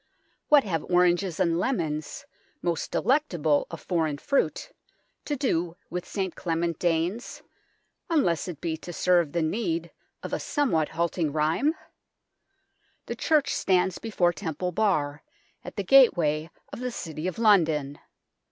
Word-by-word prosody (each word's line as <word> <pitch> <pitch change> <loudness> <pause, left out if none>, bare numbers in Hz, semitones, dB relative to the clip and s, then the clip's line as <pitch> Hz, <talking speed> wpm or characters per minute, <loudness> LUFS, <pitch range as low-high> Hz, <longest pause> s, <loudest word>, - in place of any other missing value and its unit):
What 295 -2 +6
have 165 -6 -2
oranges 180 0 +2
and 170 -2 +2
lemons, 170 - -2 0.4
most 170 -2 -1
delectable 175 - +1
of 165 - -8
foreign 160 -5 -1
fruit, 280 - -1 0.5
to 295 - -1
do 175 - -1
with 180 +1 -4
St 190 -4 -3
Clement 170 -1 -2
Danes, 175 +6 -1 0.7
unless 230 - +1
it 170 -5 -6
be 160 -2 -2
to 175 +2 -9
serve 175 -3 +2
the 170 0 0
need 170 -2 -2 0.3
of - - -6
a - - 0
somewhat 230 - 0
halting 170 -1 -1
rhyme? 160 - +1 1.3
The - - -4
church 300 -3 +2
stands 185 -1 +1
before 180 -6 +1
Temple 165 +3 -3
Bar, 160 -8 0 0.4
at 180 - -9
the 200 - -2
gateway 170 - +4 0.2
of - - -6
the 250 0 -2
City 160 -7 -5
of 185 - -4
London. 160 -10 +3
175 Hz, 135 wpm, -26 LUFS, 160-205 Hz, 1.3 s, What